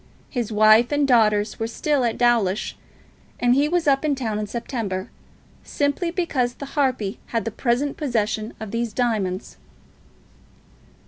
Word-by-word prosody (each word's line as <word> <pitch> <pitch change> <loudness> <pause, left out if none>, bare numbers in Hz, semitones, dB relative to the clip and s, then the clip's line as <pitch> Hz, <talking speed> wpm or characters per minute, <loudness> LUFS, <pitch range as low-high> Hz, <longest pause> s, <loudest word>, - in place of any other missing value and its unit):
His 240 -4 -2
wife 215 +3 +5
and 290 -1 +2
daughters 215 -4 +3
were 225 - -1
still 280 +3 0
at 230 -2 0
Dawlish, 230 -5 +1 0.6
and 245 0 +3
he 285 +3 +2
was 345 -2 0
up 275 0 +3
in 300 -2 +1
town 220 -5 -2
in 210 - -3
September, 220 -5 -4 0.5
simply 285 +4 -1
because 290 -9 -1
the 280 - -7
harpy 255 -9 0
had 230 -1 -2
the 225 - -2
present 255 +6 -1
possession 220 -5 -1
of 220 -2 -7
these 230 -1 -2
diamonds. 215 -6 -1
235 Hz, 145 wpm, -23 LUFS, 215-275 Hz, 0.6 s, wife